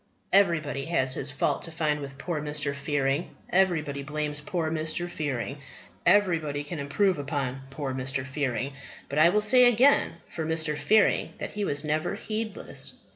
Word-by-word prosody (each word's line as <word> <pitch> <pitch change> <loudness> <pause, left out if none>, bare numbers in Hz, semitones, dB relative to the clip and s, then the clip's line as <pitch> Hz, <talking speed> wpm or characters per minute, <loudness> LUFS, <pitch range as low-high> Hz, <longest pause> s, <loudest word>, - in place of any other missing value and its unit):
Everybody 155 -8 +3
has 130 -6 +1
his 135 +1 -3
fault 140 - 0
to 165 - -5
find 155 -2 0
with 135 -1 -8
poor 160 +1 -3
Mr. 150 -1 -1
Fearing. 140 +1 -1 0.2
Everybody 160 -7 +2
blames 150 +1 -2
poor 160 0 -2
Mr. 160 +2 -2
Fearing. 145 -5 -3 0.5
Everybody 165 -7 +3
can 155 +2 -6
improve 165 +5 +1
upon 135 -2 -3
poor 135 -1 -4
Mr. 130 0 -2
Fearing. 135 -1 -2 0.4
But 140 - 0
I 165 +2 +7
will 210 +4 +2
say 250 +4 +6
again 245 +4 +4
for 160 - -5
Mr. 160 -1 0
Fearing 215 +7 +3
that - - -5
he 210 - -3
was 145 -3 0
never 155 +1 -1
heedless. 215 -1 -1
150 Hz, 160 wpm, -27 LUFS, 140-175 Hz, 0.5 s, I